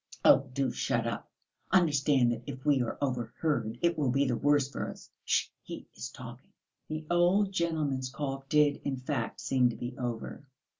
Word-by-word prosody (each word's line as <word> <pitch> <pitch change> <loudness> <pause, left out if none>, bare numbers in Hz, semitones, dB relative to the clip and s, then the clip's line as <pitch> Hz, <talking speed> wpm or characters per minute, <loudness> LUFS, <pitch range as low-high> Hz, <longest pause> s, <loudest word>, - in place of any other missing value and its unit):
"Oh, 135 0 +6
do 135 +1 0
shut - - 0
up! - - -4 0.4
Understand 145 -8 +4
that 115 -1 -3
if 135 -1 -7
we 145 -3 +4
are 120 - -2
overheard 125 -2 -1
it 170 -2 +2
will 140 -4 +2
be 135 +3 +2
the 125 -3 +1
worse 145 +1 +3
for 140 - -4
us. - - -11
Sh!... - - +2
He - - -8
is 125 - -5
talking." 125 +1 -11 0.3
The 155 0 -4
old 180 +3 +3
gentleman's 155 -7 -1
cough 135 -1 -5
did, 150 -1 +4
in 135 -2 -2
fact, 130 -2 -3
seem 130 -2 +3
to 120 - -5
be 120 0 -5
over. 120 +1 -4
135 Hz, 180 wpm, -30 LUFS, 125-150 Hz, 0.4 s, Oh